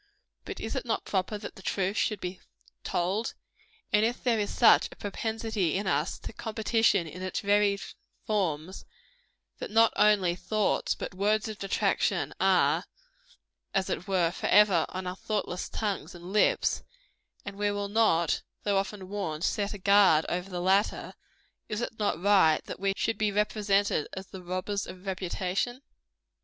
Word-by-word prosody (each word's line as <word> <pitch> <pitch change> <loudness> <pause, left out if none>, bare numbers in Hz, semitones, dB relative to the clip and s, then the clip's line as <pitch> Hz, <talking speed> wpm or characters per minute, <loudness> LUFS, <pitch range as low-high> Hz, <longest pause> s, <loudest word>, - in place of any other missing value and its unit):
But 400 - -6
is 220 - -4
it - - -2
not 230 -2 -2
proper 195 +2 -1
that 205 - -8
the - - -11
truth 190 +1 -1
should 215 -2 0
be 180 0 -6 0.4
told? 190 +6 -1 0.6
And 210 +1 +5
if 235 +2 -1
there 235 -3 +2
is 205 - -1
such 230 - +5
a - - -11
propensity 220 -3 -2
in 205 - -3
us 190 - 0
to - - -7
competition 220 -4 +1
in 170 +4 -9
its 185 -1 -3
varied 200 -1 +2 0.4
forms, 185 -4 -2 0.8
that - - -5
not 225 +2 +4
only 200 -5 +4
thoughts 205 +4 0
but - - -6
words 210 +3 +1
of 215 -1 -7
detraction 195 - 0
are, - - +3 0.9
as 190 -1 +1
it 180 - -3
were, 180 -4 +2
forever 195 -3 +4
on 185 0 -5
our 180 0 -4
thoughtless 200 -3 -3
tongues 195 -5 -3
and 175 +2 -9
lips, 210 - +2 0.6
and 200 - -6
we 205 +1 0
will 205 0 -2
not, 200 -6 +2 0.2
though 200 -1 +2
often 195 -1 -5
warned, 180 -6 -4
set 205 0 0
a 205 - -5
guard 195 -5 +5
over 180 +2 -3
the 180 -2 -4
latter, 195 +3 +1 0.6
is 215 -1 -2
it 230 -2 -5
not 205 -5 0
right 185 -5 +4
that - - -7
we 195 0 +1
should 225 - -1
be 215 -1 +1
represented 205 -4 +1
as 190 0 -6
the 190 0 -10
robbers 185 +3 -3
of 185 +1 -10
reputation? 190 +6 -2
200 Hz, 165 wpm, -28 LUFS, 185-210 Hz, 0.9 s, And